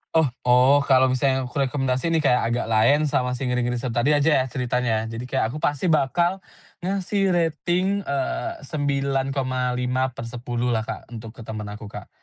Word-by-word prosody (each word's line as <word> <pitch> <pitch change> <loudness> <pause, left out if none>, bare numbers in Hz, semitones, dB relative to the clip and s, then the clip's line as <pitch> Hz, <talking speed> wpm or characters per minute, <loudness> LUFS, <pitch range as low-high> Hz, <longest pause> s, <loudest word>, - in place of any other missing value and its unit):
Oh 160 - +5 0.2
oh, 125 +3 +5
kalau 130 0 +6
misalnya 130 0 +1
aku 125 - -10 0.2
rekomendasi 135 +2 -1
nih 165 - +2
Kak, 125 -2 +4
Agak 120 +1 -1
Laen 115 +7 +3
sama 125 -4 0
si 135 - -4
Ngeri-Ngeri 125 -1 0
Sedap 120 -1 -1
tadi 140 - +2
aja 145 -2 +3
ya - - 0
ceritanya 120 -3 -1
ya. 115 - -7
Jadi, 125 +2 -6
kayak 125 -3 0
aku 150 - -6
pasti 145 +3 0
bakal 175 +4 +2 0.4
ngasih 195 +1 0
rating 175 +3 0
eee, 140 - -2
9,5/10 130 -4 -1
lah 110 - +1
Kak, 115 - -7
untuk 115 -1 -7
ke 115 - -10
temen 105 -1 -6
aku 105 +1 -8
Kak. 100 - -9
130 Hz, 170 wpm, -23 LUFS, 120-145 Hz, 0.4 s, kalau